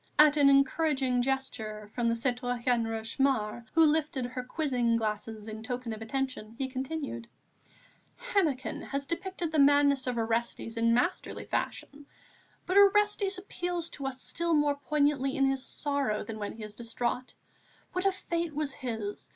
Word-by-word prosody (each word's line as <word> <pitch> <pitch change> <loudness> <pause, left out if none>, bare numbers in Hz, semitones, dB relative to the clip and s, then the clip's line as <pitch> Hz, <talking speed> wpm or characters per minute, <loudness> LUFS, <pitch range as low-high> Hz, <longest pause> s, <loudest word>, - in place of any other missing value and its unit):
At 300 0 +7
an 285 -2 +6
encouraging 275 -2 +3
gesture 220 -5 -3
from 240 -1 0
the 230 - +2
citoyenne 245 -1 0
Rochemaure, 225 0 -1
who 325 -1 +7
lifted 300 -4 +1
her 250 +1 -4
quizzing 250 -4 0
glasses 215 -1 -3
in 220 0 -6
token 245 0 -4
of 220 - -8
attention, 230 -2 -3
he 265 -1 -1
continued: 260 -2 -4 0.9
"Hennequin 375 - 0
has 280 0 -3
depicted 340 +1 -3
the 310 - +1
madness 280 -1 +5
of 250 -1 -1
Orestes 230 0 -1
in 230 0 +3
masterly 250 - -1
fashion. 285 0 -4 0.6
But 370 +2 +1
Orestes 405 -1 +4
appeals 355 -3 -4
to 275 -2 -4
us 265 -1 -4
still 335 +4 0
more 295 -1 +3
poignantly 285 -2 +1
in 275 - +4
his 270 -1 +1
sorrow 280 -9 -1
than 220 -1 -7
when 205 - -4
he 220 - -9
is 210 0 -8
distraught. 240 +2 -3 0.6
What 365 +2 +1
a - - +4
fate 340 -4 -3
was 295 -3 -1
his! 220 -6 -5
265 Hz, 155 wpm, -30 LUFS, 230-300 Hz, 0.9 s, At